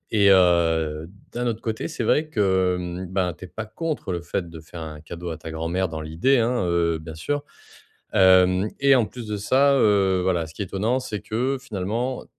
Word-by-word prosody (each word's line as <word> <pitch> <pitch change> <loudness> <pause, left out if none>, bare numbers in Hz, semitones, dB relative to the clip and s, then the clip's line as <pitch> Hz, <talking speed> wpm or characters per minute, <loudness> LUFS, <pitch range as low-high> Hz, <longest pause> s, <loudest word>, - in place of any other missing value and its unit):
Et 100 -1 +5
heu, 80 -4 +3 0.3
d'un 120 0 -2
autre 115 -2 -2
côté, 110 -1 -3
c'est 165 - -4
vrai 155 +1 +2
que, 95 -7 +2
hem, 90 +1 -5
ben, 90 -1 -1
tu 90 - -11
es - - -11
pas 110 +5 -6
contre 155 - -4
le 85 - -3
fait 85 +1 -3
de 80 -1 -10
faire 80 +1 -10
un 75 -1 -7
cadeau 85 +2 -7
à 80 - -5
ta 80 - -9
grand-mère- 85 +4 -1
dans 80 -1 -5
l'idée 80 - +2
hein- 115 -4 +1
heu, 85 -1 +1
bien 80 0 -9
sûr, 145 - -2 0.7
hem 95 +1 +5
et 140 0 +6
en 120 - +3
plus 120 0 -9
de 105 - -2
ça, 135 +7 +3
heu, 100 -6 +3
voilà, 90 -3 0
ce 80 - -14
qui 100 - -4
est - - -4
étonnant, 110 +7 0
c'est 105 -5 -5
que, 130 +5 -1
finalement, 120 +2 -3
95 Hz, 215 wpm, -24 LUFS, 85-115 Hz, 0.7 s, et